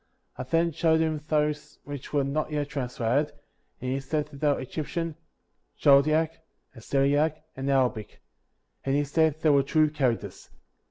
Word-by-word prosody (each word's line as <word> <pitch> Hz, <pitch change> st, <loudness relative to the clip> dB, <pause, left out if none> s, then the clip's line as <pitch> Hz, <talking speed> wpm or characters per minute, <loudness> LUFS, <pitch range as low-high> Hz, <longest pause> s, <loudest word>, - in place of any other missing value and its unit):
I -, -, -6 dB
then. 165 Hz, +6 st, +1 dB
showed 160 Hz, 0 st, +2 dB
him 160 Hz, -2 st, 0 dB
those 150 Hz, -1 st, -1 dB
which 145 Hz, -2 st, -8 dB
were 145 Hz, -2 st, +2 dB
not 145 Hz, +3 st, -1 dB
yet 145 Hz, -1 st, -2 dB
translated, 130 Hz, +2 st, -1 dB, 0.5 s
and 130 Hz, -, -3 dB
he 135 Hz, -, -1 dB
said 145 Hz, +2 st, -2 dB
that 140 Hz, -, -12 dB
they 150 Hz, -, +2 dB
were 145 Hz, -, +2 dB
Egyptian, 160 Hz, +4 st, -4 dB, 0.6 s
Chaldaic, 155 Hz, +3 st, +4 dB, 0.4 s
Assyriac, 145 Hz, +6 st, +1 dB
and 135 Hz, +1 st, -3 dB
Arabic; 125 Hz, -6 st, 0 dB, 0.6 s
and 135 Hz, 0 st, 0 dB
he 145 Hz, -, +2 dB
said 155 Hz, +1 st, +1 dB
they 155 Hz, -, +4 dB
were 140 Hz, -1 st, +5 dB
true 155 Hz, +2 st, +2 dB
characters. 130 Hz, -6 st, -2 dB
145 Hz, 155 wpm, -27 LUFS, 135-155 Hz, 0.6 s, were